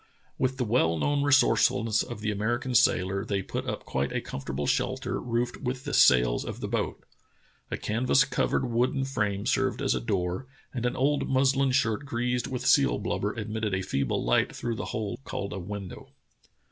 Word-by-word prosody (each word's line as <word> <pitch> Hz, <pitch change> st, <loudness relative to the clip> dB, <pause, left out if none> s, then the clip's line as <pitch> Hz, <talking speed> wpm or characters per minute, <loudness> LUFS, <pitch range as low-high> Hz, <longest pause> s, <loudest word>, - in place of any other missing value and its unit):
With 130 Hz, 0 st, 0 dB
the 125 Hz, -, 0 dB
well 105 Hz, -8 st, +2 dB
known 145 Hz, -, +1 dB
resourcefulness 120 Hz, -5 st, +3 dB
of 120 Hz, -4 st, -6 dB
the 105 Hz, 0 st, 0 dB
American 120 Hz, +5 st, -1 dB
sailor, 95 Hz, -3 st, +3 dB
they 100 Hz, -1 st, -2 dB
put -, -, -4 dB
up -, -, -4 dB
quite 65 Hz, +1 st, -1 dB
a -, -, -1 dB
comfortable 70 Hz, +1 st, -5 dB
shelter -, -, -1 dB
roofed 120 Hz, 0 st, -1 dB
with 125 Hz, -1 st, -4 dB
the -, -, -5 dB
sails -, -, +5 dB
of -, -, -6 dB
the -, -, -4 dB
boat. -, -, -2 dB, 0.7 s
A -, -, -3 dB
canvas 125 Hz, +5 st, +2 dB
covered 135 Hz, -2 st, 0 dB
wooden 125 Hz, +3 st, +1 dB
frame 105 Hz, -7 st, -1 dB
served -, -, +1 dB
as -, -, +1 dB
a 65 Hz, -, -2 dB
door, 90 Hz, -, -2 dB, 0.3 s
and 125 Hz, -1 st, -1 dB
an 125 Hz, -, -2 dB
old 140 Hz, +2 st, +1 dB
muslin 135 Hz, 0 st, +3 dB
shirt 115 Hz, 0 st, +1 dB
greased 125 Hz, -2 st, -1 dB
with 130 Hz, -1 st, -4 dB
seal 140 Hz, +1 st, +4 dB
blub 100 Hz, -, -2 dB
ber 105 Hz, +1 st, -1 dB
admitted 110 Hz, -2 st, -2 dB
a 95 Hz, -, -2 dB
feeble 70 Hz, -6 st, -1 dB
light -, -, +2 dB
through 120 Hz, -, -3 dB
the 115 Hz, -, -4 dB
hole 105 Hz, -3 st, -4 dB
called 100 Hz, -, -4 dB
a 95 Hz, -, -4 dB
window. 100 Hz, 0 st, -7 dB
115 Hz, 185 wpm, -27 LUFS, 100-130 Hz, 0.7 s, sails